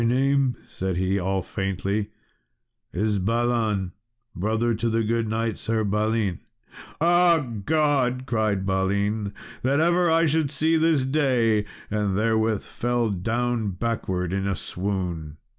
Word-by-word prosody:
"My 115 Hz, -, +2 dB
name," 135 Hz, +1 st, +2 dB
said 95 Hz, -2 st, -3 dB
he, 95 Hz, +2 st, +1 dB
all 95 Hz, 0 st, -1 dB
faintly, 100 Hz, +3 st, -2 dB, 0.8 s
"is 105 Hz, +2 st, 0 dB
Balan, 110 Hz, -2 st, 0 dB, 0.4 s
brother 110 Hz, +5 st, 0 dB
to 115 Hz, +2 st, -1 dB
the 115 Hz, 0 st, +1 dB
good 115 Hz, +1 st, 0 dB
knight 110 Hz, 0 st, -1 dB
Sir 110 Hz, 0 st, 0 dB
Balin." 105 Hz, -2 st, 0 dB, 0.6 s
"Ah, 175 Hz, +1 st, +5 dB, 0.3 s
God!" 145 Hz, -5 st, +2 dB
cried 110 Hz, -5 st, 0 dB
Balin, 100 Hz, +2 st, 0 dB, 0.3 s
"that 135 Hz, +3 st, +2 dB
ever 175 Hz, +1 st, +3 dB
I 165 Hz, +1 st, +4 dB
should 155 Hz, -1 st, +1 dB
see 160 Hz, +4 st, +1 dB
this 160 Hz, -4 st, +3 dB
day!" 125 Hz, -7 st, +2 dB, 0.3 s
and 105 Hz, -2 st, 0 dB
therewith 110 Hz, -1 st, +1 dB
fell 120 Hz, -2 st, -1 dB
down 115 Hz, +2 st, -1 dB
backwards 95 Hz, -4 st, -2 dB
in 100 Hz, 0 st, -1 dB
a 100 Hz, -, 0 dB
swoon. 90 Hz, -6 st, -4 dB
110 Hz, 130 wpm, -24 LUFS, 100-125 Hz, 0.8 s, Ah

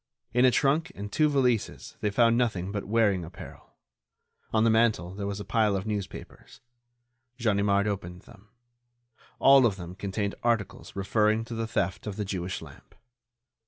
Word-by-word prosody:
In 125 Hz, +1 st, +4 dB
a -, -, +7 dB
trunk 150 Hz, +7 st, +1 dB
and 100 Hz, +1 st, -7 dB
two 155 Hz, +5 st, +3 dB
valises 125 Hz, -6 st, 0 dB
they 105 Hz, -, +1 dB
found 115 Hz, +2 st, +3 dB
nothing 105 Hz, -6 st, 0 dB
but 105 Hz, -1 st, -4 dB
wearing 105 Hz, -4 st, +2 dB
apparel. 90 Hz, +3 st, -12 dB, 0.8 s
On 110 Hz, -1 st, +2 dB
the 115 Hz, -, +4 dB
mantel 110 Hz, -6 st, +2 dB
there 100 Hz, 0 st, -4 dB
was 100 Hz, 0 st, -4 dB
a 105 Hz, -, -6 dB
pile 110 Hz, -3 st, +2 dB
of 95 Hz, -, -3 dB
newspapers. 105 Hz, -3 st, -6 dB, 0.8 s
Ganimard 100 Hz, -3 st, +2 dB
opened 90 Hz, -4 st, -4 dB
them. 105 Hz, +1 st, -18 dB, 0.9 s
All 135 Hz, 0 st, +6 dB
of 115 Hz, -5 st, +2 dB
them 90 Hz, -2 st, -8 dB
contained 100 Hz, +1 st, -3 dB
articles 115 Hz, -5 st, -2 dB
referring 105 Hz, +3 st, +1 dB
to 115 Hz, -, -8 dB
the 115 Hz, 0 st, -3 dB
theft 95 Hz, -2 st, -2 dB
of 105 Hz, -, -4 dB
the 105 Hz, -, -3 dB
Jewish 95 Hz, -2 st, -4 dB
lamp. -, -, -15 dB
105 Hz, 160 wpm, -27 LUFS, 100-115 Hz, 0.9 s, a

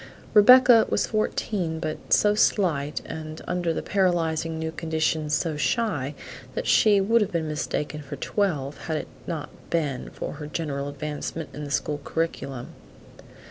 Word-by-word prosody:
Rebecca 240 Hz, +1 st, +8 dB
was -, -, +1 dB
fourteen, 195 Hz, -6 st, -1 dB
but 155 Hz, -2 st, -5 dB
so 210 Hz, 0 st, +5 dB
slight, 160 Hz, -9 st, +1 dB
and 155 Hz, 0 st, -7 dB
under 175 Hz, -1 st, 0 dB
the -, -, -3 dB
paralyzing 165 Hz, -4 st, +1 dB
new 160 Hz, 0 st, -3 dB
conditions 160 Hz, -1 st, 0 dB
so 160 Hz, -3 st, -1 dB
shy, 150 Hz, -, 0 dB, 0.4 s
that -, -, -2 dB
she 210 Hz, -2 st, +5 dB
would 225 Hz, +4 st, +3 dB
have 205 Hz, -, 0 dB
been 165 Hz, -2 st, -1 dB
mistaken 150 Hz, 0 st, -3 dB
for 140 Hz, -, -7 dB
twelve 150 Hz, -9 st, -1 dB
had 160 Hz, -2 st, -1 dB
it -, -, -5 dB, 0.2 s
not 155 Hz, -4 st, -4 dB, 0.2 s
been 150 Hz, -6 st, -1 dB
for -, -, -6 dB
her 150 Hz, -, -5 dB
general 145 Hz, -3 st, -3 dB
advancement 150 Hz, +2 st, -5 dB
in 150 Hz, +2 st, -6 dB
the -, -, -7 dB
school 145 Hz, 0 st, -1 dB
curriculum. 140 Hz, -7 st, -3 dB
160 Hz, 150 wpm, -25 LUFS, 150-185 Hz, 0.4 s, Rebecca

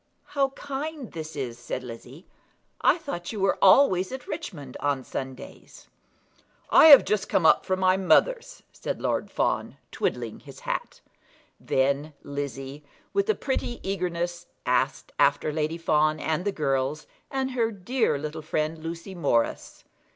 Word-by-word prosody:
"How 275 Hz, -1 st, +2 dB
kind 285 Hz, -1 st, -5 dB
this 160 Hz, -1 st, -7 dB
is," 125 Hz, -4 st, -4 dB
said 120 Hz, +2 st, -5 dB
Lizzie. 125 Hz, +7 st, -10 dB, 0.6 s
"I -, -, +4 dB
thought 175 Hz, -, -5 dB
you 215 Hz, -, -5 dB
were 195 Hz, 0 st, +1 dB
always 190 Hz, -3 st, +5 dB
at 265 Hz, 0 st, -6 dB
Richmond 150 Hz, -, -6 dB
on 140 Hz, -2 st, 0 dB
Sundays." 130 Hz, 0 st, -8 dB, 0.8 s
"I -, -, +8 dB
have 285 Hz, -3 st, +10 dB
just 210 Hz, -2 st, 0 dB
come 170 Hz, -, +2 dB
up -, -, +5 dB
from 185 Hz, 0 st, 0 dB
my 185 Hz, 0 st, +4 dB
mother's," -, -, +2 dB
said -, -, -4 dB
Lord -, -, -1 dB
Fawn, -, -, -1 dB
twiddling -, -, -2 dB
his -, -, -13 dB
hat. -, -, -4 dB, 0.6 s
Then 140 Hz, +3 st, 0 dB
Lizzie, 140 Hz, 0 st, -5 dB, 0.3 s
with 400 Hz, +1 st, +1 dB
a 435 Hz, -, +4 dB
pretty 260 Hz, -3 st, -3 dB
eagerness, 175 Hz, -2 st, -2 dB, 0.2 s
asked -, -, 0 dB
after 150 Hz, -, +3 dB
Lady 155 Hz, +1 st, -1 dB
Fawn 155 Hz, -2 st, +2 dB
and 160 Hz, +4 st, -1 dB
the 205 Hz, -, +1 dB
girls, 140 Hz, -2 st, -1 dB, 0.2 s
and 265 Hz, -1 st, -2 dB
her 235 Hz, -3 st, +1 dB
dear 220 Hz, -, 0 dB
little 155 Hz, +2 st, -5 dB
friend 155 Hz, +1 st, -2 dB
Lucy 170 Hz, +3 st, -6 dB
Morris. 140 Hz, -10 st, -1 dB
170 Hz, 145 wpm, -26 LUFS, 145-235 Hz, 0.8 s, have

